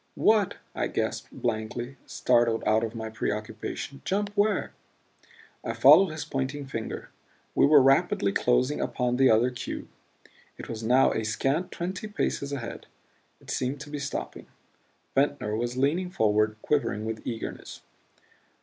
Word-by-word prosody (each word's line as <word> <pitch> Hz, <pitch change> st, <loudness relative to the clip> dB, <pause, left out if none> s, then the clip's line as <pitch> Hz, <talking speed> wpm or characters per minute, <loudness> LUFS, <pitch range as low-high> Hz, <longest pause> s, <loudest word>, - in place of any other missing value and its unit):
"What?" 215 Hz, -4 st, +3 dB, 0.2 s
I -, -, -1 dB
gasped, -, -, -2 dB
blankly, 120 Hz, +3 st, -3 dB
startled 115 Hz, -1 st, +2 dB
out 110 Hz, +1 st, +3 dB
of 115 Hz, 0 st, -3 dB
my 110 Hz, -1 st, -5 dB
preoccupation. 110 Hz, +5 st, -4 dB
"Jump 205 Hz, +1 st, -1 dB
where?" 205 Hz, -1 st, +1 dB, 0.9 s
I -, -, -2 dB
followed 155 Hz, +9 st, +7 dB
his 155 Hz, 0 st, -5 dB
pointing 135 Hz, +2 st, -3 dB
finger. 115 Hz, -5 st, -6 dB, 0.4 s
We -, -, +5 dB
were 145 Hz, -2 st, +7 dB
rapidly 135 Hz, -, +3 dB
closing 125 Hz, +6 st, +1 dB
upon 125 Hz, -1 st, -1 dB
the 135 Hz, 0 st, +5 dB
other 115 Hz, +3 st, +4 dB
cube; 125 Hz, -, -6 dB, 0.7 s
it -, -, -8 dB
was 115 Hz, -1 st, -5 dB
now 125 Hz, +4 st, +4 dB
a 110 Hz, -, -1 dB
scant 135 Hz, +10 st, -1 dB
twenty 185 Hz, +4 st, -4 dB
paces 140 Hz, -8 st, -2 dB
ahead; 130 Hz, -5 st, -6 dB, 0.5 s
it -, -, -9 dB
seemed 130 Hz, +2 st, -1 dB
to 150 Hz, -1 st, -9 dB
be 150 Hz, -, -4 dB
stopping. 140 Hz, -1 st, -5 dB, 0.7 s
Ventnor 135 Hz, -6 st, +1 dB
was 120 Hz, +2 st, -2 dB
leaning 160 Hz, +8 st, +1 dB
forward, 110 Hz, -, +2 dB
quivering 135 Hz, -7 st, 0 dB
with 110 Hz, 0 st, -4 dB
eagerness. 115 Hz, -2 st, -6 dB
130 Hz, 140 wpm, -27 LUFS, 110-150 Hz, 0.9 s, followed